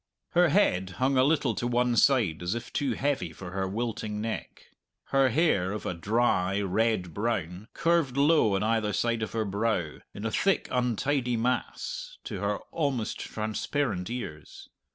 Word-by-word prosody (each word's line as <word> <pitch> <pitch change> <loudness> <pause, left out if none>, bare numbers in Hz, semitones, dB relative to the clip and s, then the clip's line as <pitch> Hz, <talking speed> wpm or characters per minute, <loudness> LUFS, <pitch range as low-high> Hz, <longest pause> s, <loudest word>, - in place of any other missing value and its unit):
Her 175 -1 +4
head 95 - +2
hung 135 +2 +2
a 130 - +5
little 140 -4 +2
to 105 +4 -2
one 120 0 +2
side 115 - +3
as 90 +5 -1
if 120 0 -6
too 140 - 0
heavy 135 - -1
for 90 +2 -9
her 95 0 -1
wilting 110 0 -3
neck. 110 +1 -5 0.4
Her 135 -1 +4
hair, 115 - +2
of 105 - -5
a - - -1
dry, 95 0 +1
red 100 -2 0
brown, 100 -3 -2
curved 165 -6 +1
low 140 -8 +4
on 95 - 0
either 110 -1 +1
side 115 +1 0
of 110 - -3
her 110 -1 0
brow, 100 -5 -1 0.2
in 105 - -6
a 115 - -1
thick, 195 - +1
untidy 125 +1 0
mass, - - -2
to - - -5
her - - 0
almost 140 -8 -1
transparent 110 -2 -2
ears. 85 -11 -7
115 Hz, 165 wpm, -28 LUFS, 100-135 Hz, 0.4 s, a